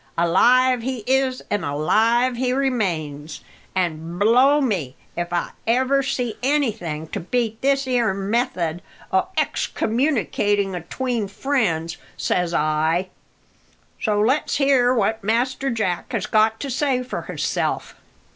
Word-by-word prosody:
Alive 250 Hz, +9 st, +4 dB
he 250 Hz, -2 st, -4 dB
is, 265 Hz, 0 st, +1 dB
an' 205 Hz, -, 0 dB
alive 225 Hz, -, +2 dB
he 250 Hz, +1 st, 0 dB
remains. 170 Hz, -, -2 dB, 0.3 s
An' 170 Hz, -2 st, -2 dB
blow 250 Hz, +8 st, +5 dB
me 185 Hz, -, -1 dB, 0.2 s
if 175 Hz, 0 st, -3 dB, 0.4 s
ever 260 Hz, +4 st, +3 dB
I -, -, 0 dB
see 250 Hz, -4 st, -2 dB
anything 225 Hz, -, -1 dB
to -, -, -4 dB
beat 225 Hz, +4 st, -2 dB
this 275 Hz, 0 st, +2 dB
'ere 245 Hz, -4 st, +1 dB
method 195 Hz, -4 st, -1 dB, 0.3 s
o' 190 Hz, -, +2 dB
excommunicating 210 Hz, -5 st, 0 dB
atween 225 Hz, +6 st, -3 dB
friends, 190 Hz, -, -1 dB, 0.2 s
says 180 Hz, -1 st, 0 dB
I. 160 Hz, +3 st, +1 dB, 0.9 s
So 210 Hz, -2 st, +1 dB
let's 255 Hz, +8 st, +1 dB
hear 270 Hz, -3 st, +3 dB
what 220 Hz, -2 st, 0 dB
Master 250 Hz, +5 st, 0 dB
Jack 215 Hz, -5 st, -2 dB
has 210 Hz, -3 st, -1 dB
got 220 Hz, +1 st, +2 dB
to 280 Hz, -, -3 dB
say 260 Hz, -1 st, 0 dB
for 250 Hz, -, -5 dB
hisself." -, -, -2 dB
225 Hz, 125 wpm, -22 LUFS, 180-255 Hz, 0.9 s, blow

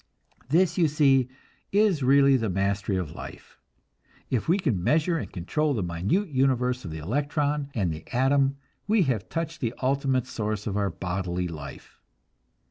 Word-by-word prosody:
This, 175 Hz, +5 st, +3 dB
you 165 Hz, -, +5 dB
see, 135 Hz, -4 st, +3 dB, 0.4 s
is 200 Hz, -6 st, +3 dB
really 135 Hz, +1 st, +5 dB
the 115 Hz, -4 st, 0 dB
mastery 100 Hz, +1 st, 0 dB
of 90 Hz, -5 st, -4 dB
life. -, -, -11 dB, 0.7 s
If 125 Hz, -, 0 dB
we 175 Hz, -, +4 dB
can 125 Hz, -, -1 dB
measure 160 Hz, -, +2 dB
and -, -, -6 dB
control 145 Hz, -, -1 dB
the 105 Hz, -, -1 dB
minute 95 Hz, -, -1 dB
universe 125 Hz, -2 st, +1 dB
of 90 Hz, -, -6 dB
the 80 Hz, -, -6 dB
electron 145 Hz, -, -1 dB
and 95 Hz, -7 st, 0 dB
the 80 Hz, -, -8 dB
atom, 135 Hz, +2 st, +2 dB, 0.3 s
we 215 Hz, -2 st, +4 dB
have 120 Hz, -, -2 dB
touched 165 Hz, -1 st, -4 dB
the 120 Hz, -1 st, -2 dB
ultimate 135 Hz, -1 st, +1 dB
source 105 Hz, -4 st, -3 dB
of 100 Hz, -, -2 dB
our 100 Hz, -1 st, +1 dB
bodily 90 Hz, 0 st, -3 dB
life. 75 Hz, -4 st, -9 dB
130 Hz, 160 wpm, -26 LUFS, 100-145 Hz, 0.7 s, you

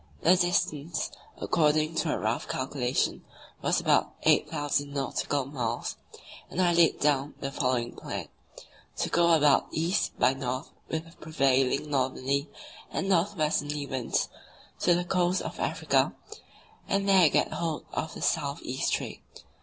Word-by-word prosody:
The 180 Hz, +3 st, +6 dB
distance, 175 Hz, -3 st, 0 dB, 0.3 s
according 155 Hz, 0 st, +2 dB
to 160 Hz, -, +1 dB
a -, -, 0 dB
rough 110 Hz, +3 st, -1 dB
calculation, 130 Hz, -1 st, -1 dB, 0.4 s
was -, -, +2 dB
about -, -, +2 dB
8,000 145 Hz, -1 st, +1 dB
nautical 140 Hz, 0 st, -1 dB
miles, 120 Hz, -4 st, -3 dB, 0.5 s
and -, -, -5 dB
I 175 Hz, -2 st, +4 dB
laid 170 Hz, -1 st, +4 dB
down 145 Hz, -1 st, +1 dB
the 135 Hz, -, -4 dB
following 125 Hz, -4 st, -1 dB
plan: -, -, -5 dB, 0.7 s
To -, -, -1 dB
go 170 Hz, 0 st, +3 dB
about 150 Hz, -3 st, +4 dB
east 165 Hz, +4 st, -1 dB
by 130 Hz, -, +4 dB
north 130 Hz, -1 st, -4 dB, 0.2 s
with 160 Hz, 0 st, -2 dB
the 165 Hz, -, -16 dB
prevailing 135 Hz, -1 st, +1 dB
northerly 135 Hz, +1 st, 0 dB, 0.4 s
and 195 Hz, -, -2 dB
north 195 Hz, +3 st, +2 dB
westerly 150 Hz, -2 st, 0 dB
winds 130 Hz, -4 st, -1 dB, 0.5 s
to 175 Hz, -, +4 dB
the 175 Hz, 0 st, -1 dB
coast 180 Hz, 0 st, +1 dB
of -, -, -6 dB
Africa, -, -, +1 dB, 0.7 s
and 195 Hz, 0 st, +1 dB
there 190 Hz, -5 st, +6 dB
get -, -, +1 dB
hold 165 Hz, -3 st, -3 dB
of 160 Hz, -, -3 dB
the -, -, -6 dB
south 145 Hz, -3 st, 0 dB
east 130 Hz, +1 st, -1 dB
trade. -, -, -3 dB
150 Hz, 145 wpm, -28 LUFS, 135-170 Hz, 0.7 s, The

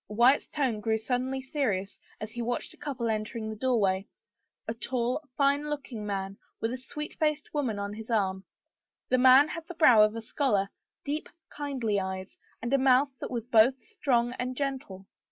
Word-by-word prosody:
Wyatt's 240 Hz, +6 st, +4 dB
tone 260 Hz, -8 st, -1 dB
grew 220 Hz, +1 st, +1 dB
suddenly 255 Hz, +3 st, -2 dB
serious 215 Hz, -9 st, -2 dB, 0.2 s
as 215 Hz, 0 st, -6 dB
he 240 Hz, 0 st, -5 dB
watched 240 Hz, +1 st, -2 dB
a -, -, -19 dB
couple 270 Hz, -5 st, -3 dB
entering 220 Hz, 0 st, -2 dB
the -, -, -5 dB
doorway, 205 Hz, -6 st, +1 dB, 0.6 s
a 225 Hz, -, -1 dB
tall, 245 Hz, +3 st, -1 dB, 0.2 s
fine 285 Hz, +1 st, +2 dB
look 290 Hz, -2 st, -4 dB
ing 215 Hz, -3 st, -5 dB
man 195 Hz, -1 st, -3 dB, 0.2 s
with 225 Hz, +2 st, -1 dB
a -, -, -3 dB
sweet 300 Hz, +4 st, -6 dB
faced 305 Hz, -1 st, 0 dB
woman 260 Hz, -8 st, -1 dB
on 200 Hz, 0 st, -3 dB
his 220 Hz, +2 st, -9 dB
arm. 190 Hz, -4 st, 0 dB, 0.7 s
The 255 Hz, -, +3 dB
man 260 Hz, +4 st, +7 dB
had 330 Hz, 0 st, -6 dB
the 355 Hz, -, -8 dB
brow 250 Hz, -9 st, +7 dB
of 215 Hz, +1 st, +4 dB
a 230 Hz, -, -4 dB
scholar, 210 Hz, -6 st, 0 dB, 0.3 s
deep, 295 Hz, +2 st, -3 dB, 0.2 s
kindly 260 Hz, -8 st, -1 dB
eyes, 190 Hz, 0 st, -5 dB, 0.2 s
and 240 Hz, +3 st, -1 dB
a 275 Hz, -, +5 dB
mouth 265 Hz, 0 st, +3 dB
that -, -, -5 dB
was 235 Hz, -3 st, -3 dB
both 240 Hz, +2 st, +5 dB
strong 250 Hz, -, 0 dB
and 250 Hz, 0 st, -3 dB
gentle. 260 Hz, -9 st, -4 dB
245 Hz, 185 wpm, -29 LUFS, 215-275 Hz, 0.7 s, man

